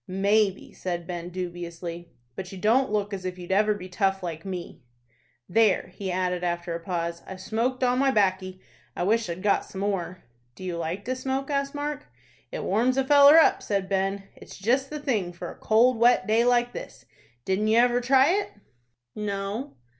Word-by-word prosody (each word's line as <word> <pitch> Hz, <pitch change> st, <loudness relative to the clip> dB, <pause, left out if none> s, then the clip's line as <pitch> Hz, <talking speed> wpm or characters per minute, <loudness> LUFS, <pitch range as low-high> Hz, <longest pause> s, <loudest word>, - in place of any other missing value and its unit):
"Maybe," 200 Hz, +1 st, +1 dB
said 175 Hz, -2 st, -4 dB
Ben, 175 Hz, 0 st, -5 dB
dubiously; 175 Hz, -1 st, -6 dB, 0.3 s
"but 190 Hz, -1 st, -7 dB
you 195 Hz, -, -8 dB
don't 230 Hz, +7 st, +2 dB
look 205 Hz, -1 st, -1 dB
as 190 Hz, -1 st, -5 dB
if 185 Hz, 0 st, -4 dB
you'd 180 Hz, 0 st, -8 dB
ever 210 Hz, +2 st, +3 dB
be 185 Hz, -2 st, -8 dB
tough 195 Hz, 0 st, 0 dB
like 165 Hz, -2 st, -5 dB
me." 185 Hz, -3 st, -7 dB, 0.7 s
"There," 210 Hz, -2 st, +2 dB
he 190 Hz, 0 st, -4 dB
added, 180 Hz, -1 st, -1 dB
after 175 Hz, 0 st, -2 dB
a 165 Hz, -, -3 dB
pause, 170 Hz, -1 st, -3 dB
"I've 190 Hz, -1 st, -8 dB
smoked 230 Hz, +6 st, -1 dB
all 250 Hz, 0 st, +3 dB
my 270 Hz, +2 st, +3 dB
'baccy. 185 Hz, -4 st, 0 dB, 0.4 s
I -, -, -2 dB
wish 220 Hz, +1 st, +1 dB
I'd 170 Hz, +3 st, -5 dB
got 205 Hz, -1 st, +2 dB
some 190 Hz, -, -8 dB
more." 185 Hz, -3 st, -3 dB, 0.3 s
"Do -, -, -11 dB
you 180 Hz, -2 st, -3 dB
like 170 Hz, +4 st, -4 dB
to 255 Hz, -, -1 dB
smoke?" 265 Hz, +2 st, -3 dB
asked 280 Hz, 0 st, -1 dB
Mark. 290 Hz, 0 st, -4 dB, 0.4 s
"It -, -, -4 dB
warms 240 Hz, +7 st, +1 dB
a 270 Hz, -, +2 dB
feller 285 Hz, +2 st, +8 dB
up," 325 Hz, -, +5 dB
said 195 Hz, -2 st, -2 dB
Ben. 195 Hz, 0 st, -1 dB
"It's -, -, -12 dB
jest 255 Hz, +7 st, +1 dB
the 300 Hz, -, -5 dB
thing 215 Hz, -11 st, -1 dB
for 175 Hz, -, -7 dB
a -, -, -12 dB
cold, 230 Hz, +2 st, +3 dB
wet 240 Hz, +1 st, +4 dB
day 225 Hz, +2 st, +3 dB
like 245 Hz, 0 st, +2 dB
this. -, -, -9 dB, 0.4 s
Didn't 195 Hz, +3 st, 0 dB
you 220 Hz, +1 st, +3 dB
ever 245 Hz, +1 st, +4 dB
try 265 Hz, +4 st, +4 dB
it?" 405 Hz, +2 st, 0 dB, 0.6 s
"No." 205 Hz, -, -4 dB
200 Hz, 190 wpm, -26 LUFS, 185-245 Hz, 0.7 s, feller